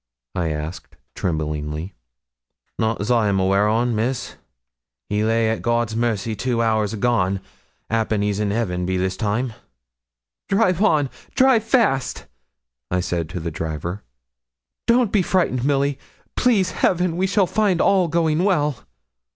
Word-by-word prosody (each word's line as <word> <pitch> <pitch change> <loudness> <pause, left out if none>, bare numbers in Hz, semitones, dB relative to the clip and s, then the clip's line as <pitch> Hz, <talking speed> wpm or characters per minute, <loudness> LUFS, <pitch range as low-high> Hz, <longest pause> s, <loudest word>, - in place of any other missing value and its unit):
I 85 -3 -1
asked, 75 +2 -6 0.2
tremblingly. 75 +1 -3 0.9
'Not 110 -1 0
as 105 +4 -1
I'm 105 -5 +2
aweer 100 +2 +3
on, 115 +3 +1
Miss; 120 +4 -2 0.8
he 105 +1 0
lay 115 +1 +2
at 110 - -2
God's 120 -2 0
mercy 115 -2 -1
two 120 +2 -1
hours 110 -2 +1
agone; 100 -4 +1 0.5
'appen 110 -2 0
he's 105 0 -1
in 105 -1 0
heaven 90 -5 -1
be 95 0 0
this 95 0 -1
time.' 110 +4 -1 1.0
'Drive 195 -3 +2
on 150 -10 +3 0.2
drive 255 -4 +4
fast,' 220 - +1 0.6
I 90 - 0
said 85 -3 -2
to 90 - -5
the 85 0 -4
driver. 80 +5 -4 0.9
'Don't 235 -3 +3
be 205 - +3
frightened, 170 -9 +1
Milly; 140 0 +1 0.4
please 210 -7 +2
Heaven 180 -2 +1
we 185 +2 +1
shall 200 0 +3
find 195 -1 +1
all 190 -3 +3
going 165 0 +1
well.' 150 - +1
115 Hz, 140 wpm, -22 LUFS, -, 1.0 s, drive